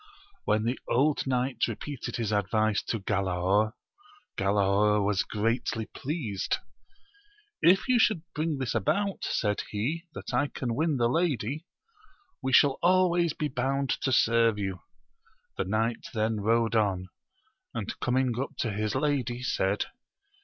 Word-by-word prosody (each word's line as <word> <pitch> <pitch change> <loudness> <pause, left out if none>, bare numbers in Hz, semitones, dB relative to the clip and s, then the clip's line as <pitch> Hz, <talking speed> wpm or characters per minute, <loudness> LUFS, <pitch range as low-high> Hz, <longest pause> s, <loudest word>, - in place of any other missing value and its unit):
When 105 +1 +2
the 120 +3 -1
old 140 +3 +2
knight 130 0 0
repeated 145 -4 -5
his 115 -3 -2
isidvice 105 +1 +1
to 115 - -2
Galaor, 95 +2 +1 0.6
Galaor 100 +1 +2
was 100 -2 +2
greatly 115 +1 -1
pleased: 125 - -3 1.0
If 185 +7 +5
you 250 -2 +4 0.3
bring 155 -1 -1
this 130 -3 -2
about, 195 - 0
said 105 -2 0
he, 150 - -2
that - - -7
I 145 - +2
can 125 -4 -3
win 155 +3 +1
the 120 -1 +3
lady, 145 - -1 0.7
we 130 -1 -1
shall 135 +1 +5
always 175 -2 +3
be 150 - -2
bound 135 0 -1
to 130 - 0
serve 115 -2 +4
you. 95 -3 -3 0.8
The - - -1
knight 110 +4 -1
then 110 0 0
rode 115 +1 +2
on, 95 -4 +1 0.7
and - - -3
coming 130 0 +1
up 135 - -4
to 115 - -1
his 105 +2 -2
lady, 130 -3 0
said. 100 -5 0
115 Hz, 135 wpm, -28 LUFS, 105-140 Hz, 1.0 s, If